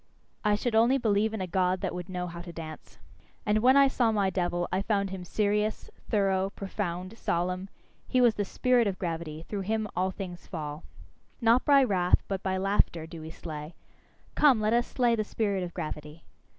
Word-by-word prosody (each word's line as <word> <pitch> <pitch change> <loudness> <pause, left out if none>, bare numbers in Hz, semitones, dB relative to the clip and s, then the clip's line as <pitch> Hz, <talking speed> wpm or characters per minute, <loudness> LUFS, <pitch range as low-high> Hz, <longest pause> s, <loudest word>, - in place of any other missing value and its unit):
I 210 -1 +3
should 230 +3 -2
only 235 +4 +5
believe 220 -3 +2
in 220 -3 -4
a - - -1
God 185 +1 +1
that 190 - -2
would 180 +1 -6
know 180 -1 -3
how 170 -1 -7
to 175 0 -8
dance. 160 -2 -9 0.5
And 210 0 +3
when 255 +4 +5
I 275 0 +7
saw 245 -3 +2
my 200 -3 +1
devil, 175 -1 -1
I 185 - +1
found 200 -2 0
him 190 -1 -5
serious, 210 +3 -1 0.2
thorough, 195 -2 +2
profound, 185 -1 -4
solemn: 180 +2 -1 0.4
he 255 - +2
was 240 -3 +5
the 205 - -1
spirit 245 +3 +2
of 190 -2 -2
gravity 165 -2 -4
through 205 -2 -3
him 215 +2 -1
all 185 +1 +1
things 180 -2 -7
fall. 150 -1 -5 0.6
Not 235 +1 +4
by 280 -2 +6
wrath, 185 -7 +2
but 195 -2 -2
by 190 -1 -1
laughter, 190 -4 +1
do 165 0 -9
we 160 - -7
slay. 155 -1 -8 0.6
Come, 275 -6 +5
let 215 +1 +1
us 240 0 +2
slay 240 -2 +2
the 215 - 0
spirit 205 -2 -1
of 175 -1 -4
gravity! 155 -2 -6
195 Hz, 195 wpm, -28 LUFS, 175-220 Hz, 0.6 s, I